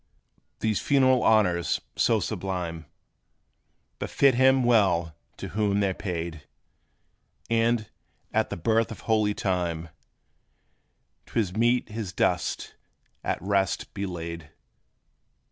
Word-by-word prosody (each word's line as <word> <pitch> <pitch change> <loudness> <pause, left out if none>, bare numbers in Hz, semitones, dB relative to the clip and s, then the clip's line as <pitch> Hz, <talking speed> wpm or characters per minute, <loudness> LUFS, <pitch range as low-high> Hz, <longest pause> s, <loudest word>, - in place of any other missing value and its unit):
These 110 -2 +1
funeral 130 -2 +3
honors, 90 -6 +3 0.2
so - - +3
sublime, 85 -4 -4 1.1
Befit 140 -2 +3
him 130 +1 +4
well 95 -9 +3 0.2
to - - -6
whom 100 -1 +1
they 100 -2 +2
're - - -3
paid; 85 -5 -5 1.0
And, 115 -1 +2 0.5
at - - +1
the - - -4
birth 115 +6 +1
of 110 - -8
holy 110 -2 +1
time, 85 -3 -2 1.4
'T - - -1
is 95 -4 -1
meet 120 +2 +2
his 105 -4 -5
dust 90 -2 -1 0.5
at - - -1
rest 95 -2 0
be 100 0 -3
laid. 85 -3 -6
100 Hz, 110 wpm, -26 LUFS, 85-115 Hz, 1.4 s, him